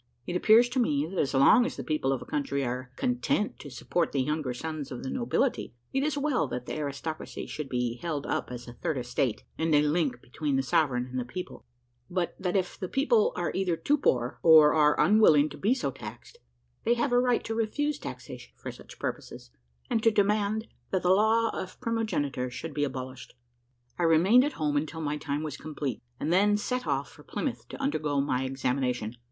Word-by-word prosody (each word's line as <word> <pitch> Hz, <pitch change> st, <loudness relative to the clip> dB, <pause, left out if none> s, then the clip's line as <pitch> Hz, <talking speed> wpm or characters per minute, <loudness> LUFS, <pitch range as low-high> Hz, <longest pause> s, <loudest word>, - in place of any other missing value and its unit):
It 175 Hz, -, -4 dB
appears 225 Hz, +6 st, +6 dB
to 255 Hz, -, -1 dB
me, 150 Hz, -, +2 dB
that 180 Hz, +3 st, -4 dB
as 140 Hz, -, 0 dB
long 140 Hz, -, +6 dB
as 250 Hz, -, -3 dB
the -, -, -4 dB
people 155 Hz, -4 st, 0 dB
of 135 Hz, -, -2 dB
a -, -, -15 dB
country 140 Hz, -1 st, -1 dB
are 125 Hz, +1 st, -4 dB
content 250 Hz, -, 0 dB
to 145 Hz, -, -9 dB
support 155 Hz, +6 st, -1 dB
the 135 Hz, -2 st, +2 dB
younger 150 Hz, -1 st, -1 dB
sons 150 Hz, +2 st, -5 dB
of 125 Hz, -, -6 dB
the 130 Hz, -, -4 dB
nobility, 245 Hz, -, -1 dB, 0.2 s
it 270 Hz, -, +1 dB
is 295 Hz, 0 st, 0 dB
well 280 Hz, -, +1 dB
that 125 Hz, -1 st, -5 dB
the -, -, -5 dB
aristocracy 150 Hz, +2 st, -5 dB
should 150 Hz, -3 st, -6 dB
be 125 Hz, -2 st, -1 dB
held 150 Hz, 0 st, -3 dB
up -, -, -2 dB
as 125 Hz, 0 st, -7 dB
a 120 Hz, -, -8 dB
third 145 Hz, +4 st, -2 dB
estate, 125 Hz, -1 st, -1 dB, 0.2 s
and 160 Hz, -1 st, +2 dB
a 145 Hz, -, +5 dB
link 150 Hz, -5 st, +1 dB
between 140 Hz, +3 st, -3 dB
the 135 Hz, -, +1 dB
sovereign 130 Hz, -2 st, +1 dB
and 130 Hz, 0 st, -4 dB
the -, -, -1 dB
people; 180 Hz, +10 st, -8 dB, 0.4 s
but 175 Hz, -1 st, -1 dB
that 180 Hz, 0 st, -1 dB
if 185 Hz, -2 st, -1 dB
the 185 Hz, -, -3 dB
people 440 Hz, -, +3 dB
are -, -, -1 dB
either 185 Hz, -3 st, 0 dB
too 280 Hz, -, +2 dB
poor, 125 Hz, -, 0 dB
or 155 Hz, -2 st, +8 dB
are 150 Hz, -1 st, +4 dB
unwilling 160 Hz, -8 st, +5 dB
to 145 Hz, -, -9 dB
be 220 Hz, +6 st, +2 dB
so 140 Hz, -, -2 dB
taxed, -, -, -10 dB, 0.4 s
they 235 Hz, -, +3 dB
have 240 Hz, +2 st, 0 dB
a 245 Hz, -, +5 dB
right 245 Hz, -1 st, +2 dB
to 225 Hz, -, -3 dB
refuse 290 Hz, +7 st, -1 dB
taxation 125 Hz, 0 st, -8 dB
for -, -, -7 dB
such -, -, -14 dB
purposes, -, -, -6 dB, 0.4 s
and 225 Hz, -, 0 dB
to 225 Hz, -, +5 dB
demand 210 Hz, +1 st, +1 dB, 0.2 s
that 190 Hz, -, -1 dB
the 180 Hz, -, +4 dB
law 220 Hz, +3 st, +3 dB
of 185 Hz, -, -6 dB
primogeniture 150 Hz, -, -1 dB
should 135 Hz, +6 st, -6 dB
be 145 Hz, -, 0 dB
abolished. 130 Hz, -2 st, -5 dB, 0.6 s
I -, -, +1 dB
remained 180 Hz, +10 st, +6 dB
at 290 Hz, -, -2 dB
home 150 Hz, -2 st, 0 dB
until 155 Hz, +2 st, -3 dB
my 150 Hz, -1 st, -1 dB
time 145 Hz, 0 st, -3 dB
was 155 Hz, -, -5 dB
complete, 145 Hz, -6 st, -4 dB, 0.2 s
and 160 Hz, -, 0 dB
then 205 Hz, +3 st, +4 dB
set 250 Hz, +4 st, -3 dB
off -, -, -1 dB
for -, -, -16 dB
Plymouth -, -, -4 dB
to -, -, -8 dB
undergo 155 Hz, -, 0 dB
my 135 Hz, -2 st, 0 dB
examination. 125 Hz, -3 st, -1 dB
155 Hz, 210 wpm, -28 LUFS, 135-215 Hz, 0.6 s, or